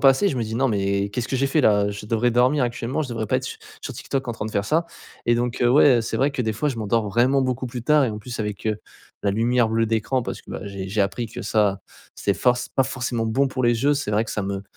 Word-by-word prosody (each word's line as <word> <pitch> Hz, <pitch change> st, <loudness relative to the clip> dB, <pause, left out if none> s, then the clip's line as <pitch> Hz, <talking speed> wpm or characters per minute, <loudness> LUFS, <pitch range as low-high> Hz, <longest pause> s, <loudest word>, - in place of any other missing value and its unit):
passer, 135 Hz, +9 st, +5 dB
je 135 Hz, -, -2 dB
me 120 Hz, -, 0 dB
dis: 110 Hz, 0 st, -4 dB
«Non 135 Hz, +1 st, +2 dB
mais, 100 Hz, -2 st, 0 dB
qu'est-ce 125 Hz, +2 st, -3 dB
que 135 Hz, -, 0 dB
j'ai 135 Hz, +2 st, +1 dB
fait 150 Hz, +3 st, +2 dB
là? 105 Hz, -4 st, +4 dB
Heu, -, -, -1 dB
je 100 Hz, +1 st, -8 dB
devrais 115 Hz, +2 st, +1 dB
dormir 125 Hz, +3 st, +3 dB
actuellement, 120 Hz, +5 st, -2 dB
je 135 Hz, -, -5 dB
devrais 110 Hz, -2 st, -3 dB
pas -, -, +3 dB
être -, -, -3 dB
su -, -, -6 dB, 0.2 s
sur -, -, -6 dB
TikTok 135 Hz, -1 st, -3 dB
en 120 Hz, -, -2 dB
train 110 Hz, -1 st, -5 dB
de -, -, -5 dB
faire 100 Hz, -1 st, -1 dB
ça» 165 Hz, +6 st, +1 dB, 0.4 s
et 120 Hz, 0 st, +4 dB
donc, 120 Hz, +1 st, -2 dB
heu, 120 Hz, -, +5 dB
ouais, 130 Hz, -2 st, +6 dB
heu, -, -, +1 dB
c'est 115 Hz, -, -3 dB
vrai 140 Hz, +2 st, +2 dB
que 125 Hz, -, -1 dB
des 110 Hz, -1 st, -1 dB
fois 145 Hz, +8 st, -1 dB
je 130 Hz, -, -3 dB
m'endors 110 Hz, 0 st, 0 dB
vraiment 125 Hz, +6 st, +3 dB
beaucoup 130 Hz, 0 st, -1 dB
plus 120 Hz, -1 st, -6 dB
tard 150 Hz, +1 st, +5 dB
et 120 Hz, -, -1 dB
en 105 Hz, -, -5 dB
plus 120 Hz, +1 st, -6 dB
avec, 105 Hz, 0 st, -4 dB
heu, 105 Hz, -1 st, 0 dB, 0.5 s
la 100 Hz, -, +3 dB
lumière 115 Hz, +2 st, +2 dB
bleue 115 Hz, 0 st, +1 dB
d'écran, 115 Hz, +4 st, 0 dB
parce -, -, -6 dB
que, -, -, -14 dB
bah, -, -, -5 dB
j'ai 100 Hz, -1 st, -6 dB
j'ai 105 Hz, +2 st, -1 dB
appris 100 Hz, +4 st, 0 dB
que 115 Hz, -, -7 dB
ça, 105 Hz, -3 st, +1 dB, 0.4 s
c'est 100 Hz, -, 0 dB
force 125 Hz, -1 st, +2 dB
c'est -, -, -15 dB
pas 135 Hz, -, +4 dB
forcément 125 Hz, -3 st, -2 dB
bon 135 Hz, +5 st, +2 dB
pour 130 Hz, -1 st, -3 dB
les 120 Hz, +2 st, +2 dB
yeux, 145 Hz, -, +4 dB
c'est 140 Hz, -7 st, -2 dB
vrai 105 Hz, +2 st, +2 dB
que -, -, -6 dB
ça 105 Hz, -, -2 dB
me 100 Hz, 0 st, -3 dB
120 Hz, 305 wpm, -23 LUFS, 105-130 Hz, 0.5 s, ouais